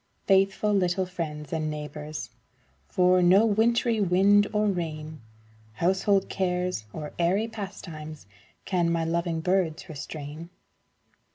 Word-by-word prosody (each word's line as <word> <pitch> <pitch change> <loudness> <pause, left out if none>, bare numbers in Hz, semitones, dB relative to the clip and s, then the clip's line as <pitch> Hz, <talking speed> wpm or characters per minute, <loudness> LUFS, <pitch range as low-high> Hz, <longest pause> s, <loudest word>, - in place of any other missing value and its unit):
Faithful 195 +2 +3
little 185 -1 +1
friends 155 -5 -5
and 155 -1 -1
neighbors, 150 0 -6 0.6
For 180 - +3
no 185 +5 +6
wintry 225 +1 +2
wind 200 +2 +4
or 210 0 +1
rain, 155 - -3 0.5
Household 190 - +2
cares 180 - -1
or 150 +4 -7
airy 190 +6 +2
pastimes, 170 -8 -8 0.4
Can 175 -3 +1
my 165 -1 0
loving 170 0 -1
birds 180 -2 0
restrain. 155 +1 -7
180 Hz, 110 wpm, -27 LUFS, 155-195 Hz, 0.6 s, no